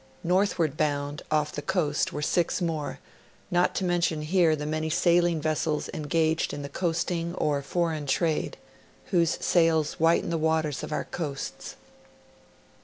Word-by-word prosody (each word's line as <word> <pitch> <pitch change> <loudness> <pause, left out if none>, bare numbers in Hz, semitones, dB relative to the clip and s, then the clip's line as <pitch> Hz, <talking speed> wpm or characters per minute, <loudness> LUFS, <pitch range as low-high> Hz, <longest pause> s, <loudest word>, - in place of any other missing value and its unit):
Northward 175 -4 +1
bound, 145 -2 -1
off 150 -1 +1
the 145 - -5
coast, 160 -5 0
were 150 - -4
six 175 +3 +1
more, 160 -5 -2 0.5
not 175 0 +2
to - - -1
mention 170 -3 +1
here 165 0 +3
the 150 -1 -5
many 155 +1 -2
sailing 170 0 +3
vessels 155 0 -1
engaged 160 +1 0
in 145 - -6
the 140 - -6
coasting^or 170 -2 -1
foreign 160 -1 -1
ti'ade, 155 +3 0 0.6
whose 170 -4 +2
sails 165 -3 +2
whiten 165 +1 +3
the 165 - 0
waters 160 -2 0
of - - -6
our 150 - -1
coasts. 145 -5 -5
160 Hz, 140 wpm, -27 LUFS, 150-170 Hz, 0.6 s, here